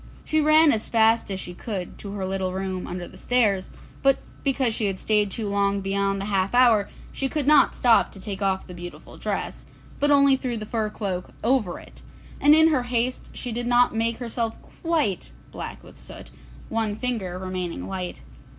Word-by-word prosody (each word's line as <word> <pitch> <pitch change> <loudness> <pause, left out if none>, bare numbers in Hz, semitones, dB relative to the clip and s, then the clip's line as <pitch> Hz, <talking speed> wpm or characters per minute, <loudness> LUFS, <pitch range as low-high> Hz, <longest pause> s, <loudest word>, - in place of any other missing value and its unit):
She 310 0 +2
ran 310 0 +6
as 220 -4 -1
fast 225 -1 +3
as 190 -1 -3
she 180 - -6
could 190 -2 -6
to 200 -1 -7
her 195 -2 -3
little 190 -1 -2
room 190 -1 -3
under 175 0 -5
the - - -14
stairs, 210 -7 +1 0.3
but 275 -1 +4 0.3
because 265 -4 +2
she 215 -1 0
had 195 -1 -2
stayed 210 0 +1
too 215 +2 -3
long 200 0 +1
beyond 195 0 0
the 195 - -3
half 195 +1 0
hour, 230 -5 +5 0.2
she 270 - -2
could 300 -1 -1
not 295 0 +5
stop 240 -2 +4
to 195 - -10
take 195 0 -6
off 190 -1 0
the 180 - -10
beautiful 175 0 -10
dress, - - -3 0.4
but 290 - +2
only 280 -1 +6
threw 255 -3 -2
the 215 - -5
fur 220 -1 -1
cloak 190 -4 -4
over 230 -6 +1
it, - - -15 0.4
and 295 +1 +7
in 320 +1 +6
her 295 -5 +2
haste 245 +1 -2
she 245 - -6
did 240 +1 -3
not 245 0 +4
make 230 +1 0
herself 230 -2 -3 0.2
quite 310 - 0 0.2
black - - -7
with - - -15
the - - -14
soot, - - -11 0.4
one 220 -2 -1
finger 215 -7 -3
remaining 185 -2 -4
white. 185 -2 -5
215 Hz, 195 wpm, -24 LUFS, 195-250 Hz, 0.4 s, and